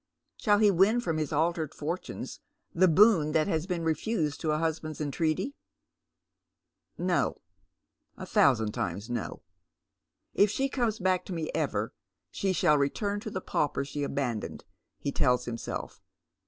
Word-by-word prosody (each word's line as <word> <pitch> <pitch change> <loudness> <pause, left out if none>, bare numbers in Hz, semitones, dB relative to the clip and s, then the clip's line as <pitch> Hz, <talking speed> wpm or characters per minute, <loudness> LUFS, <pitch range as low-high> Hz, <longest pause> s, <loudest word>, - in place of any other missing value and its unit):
Sliall 210 0 +4
he 205 - +6
win 195 +6 +4
from 165 -9 -1
his 155 0 -2
altered 160 0 0
fortunes 165 +5 -5 0.3
the 185 +2 +5
boon 175 -4 +5
that 155 -1 +3
has 160 +2 -1
been 175 -3 -2
refused 160 -1 -1
to 160 - -1
a 150 - +2
husband's 155 -1 -2
entreaty? 155 - -1 1.4
No, 180 0 +1 0.8
a - - -6
thousand 110 -6 +3
times 100 +5 -3
no. 120 -3 -4 0.4
" - - -56
If 205 - +4
she 270 +6 0
comes 235 -5 0
back 185 -2 +1
to 190 - -5
me 165 -2 -3
ever - - -1 0.4
she 195 - 0
shall 160 -5 +3
return 200 +9 0
to 215 - -6
the 185 -2 -4
pauper 145 -4 -1
she 145 +1 -5
abandoned," 135 -6 -3 0.3
he 140 - -3
tells 125 -2 +2
himself. 115 -1 -5
160 Hz, 150 wpm, -29 LUFS, 145-190 Hz, 1.4 s, he